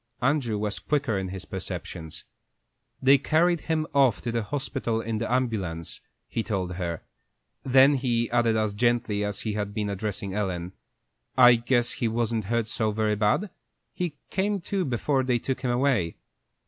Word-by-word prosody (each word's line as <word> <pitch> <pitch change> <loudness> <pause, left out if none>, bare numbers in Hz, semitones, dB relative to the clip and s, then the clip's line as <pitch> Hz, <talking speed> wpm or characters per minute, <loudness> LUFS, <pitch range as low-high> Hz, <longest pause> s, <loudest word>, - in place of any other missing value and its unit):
Andrew 125 -4 +1
was 105 0 -2
quicker 145 -7 0
in 95 - -3
his 95 0 -7
perceptions. 80 -2 -6 0.8
"They 135 +1 +6
carried 165 +4 +2
him 160 -1 0
off 135 -5 +4
to 120 - -2
the 115 0 0
hospital 125 -1 -2
in 115 -1 -2
the 115 - -2
ambulance," 100 -10 -1 0.3
he 115 - -2
told 95 -5 -2
her. 85 -3 -3 0.6
Then 135 +2 +6
he 120 -3 +1
added, 120 -2 +3
as 110 -2 0
gently 115 -2 +1
as 105 -1 -2
if - - -6
he 110 - -2
had 100 -1 -3
been 105 -1 -1
addressing 100 -1 -4
Ellen: 90 -3 -2 0.6
"I 125 0 +9
guess 120 +1 +1
he 120 - -1
wasn't 115 -1 -1
hurt 115 +1 0
so 110 0 0
very 105 0 +1
bad. 110 - +1 0.4
He 175 -4 -3 0.2
came 200 +1 0
to 190 +1 -1
before 135 +1 +1
they 125 -1 +2
took 130 +2 -3
him 130 - -1
away." 120 -9 +1
115 Hz, 170 wpm, -26 LUFS, 105-130 Hz, 0.8 s, I